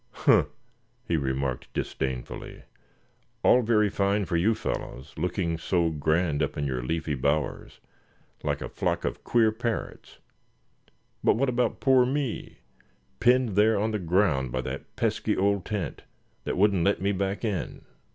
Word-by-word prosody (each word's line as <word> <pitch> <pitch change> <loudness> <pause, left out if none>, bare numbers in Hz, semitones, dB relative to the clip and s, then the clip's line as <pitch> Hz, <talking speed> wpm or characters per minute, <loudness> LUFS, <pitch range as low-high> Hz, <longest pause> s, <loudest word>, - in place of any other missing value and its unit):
"Huh!" - - +4 0.6
he 85 - +1
remarked, 65 -3 -2
disdainfully; 65 -2 -4 0.8
"all 125 - +6
very 110 -2 +3
fine 100 +1 +1
for 85 - -2
you 100 +7 +3
fellows, 65 -5 -5
looking 85 0 -1
so 85 -1 +1
grand 80 0 +1
up - - -1
in 70 - -1
your 65 -3 -2
leafy 80 +4 -2
bowers, 70 +3 -1 0.6
like - - -2
a - - -4
flock - - -1
of - - -3
queer 115 -2 +3
parrots; 115 +1 -4 1.1
but - - +4
what 130 +3 +1
about 125 0 0
poor 130 -2 +5
me, 130 -1 -3 0.6
pinned 125 0 +4
there 105 +2 +3
on 110 +2 0
the 105 - -1
ground 85 -8 +1
by 65 +1 -1
that - - -7
pesky - - 0
old 100 -1 +1
tent, 105 -5 -3 0.4
that - - -2
wouldn't 100 -3 +3
let 100 -1 +2
me 100 +2 +1
back 100 +3 -2
in? 100 -8 -3
95 Hz, 150 wpm, -27 LUFS, 80-110 Hz, 1.1 s, all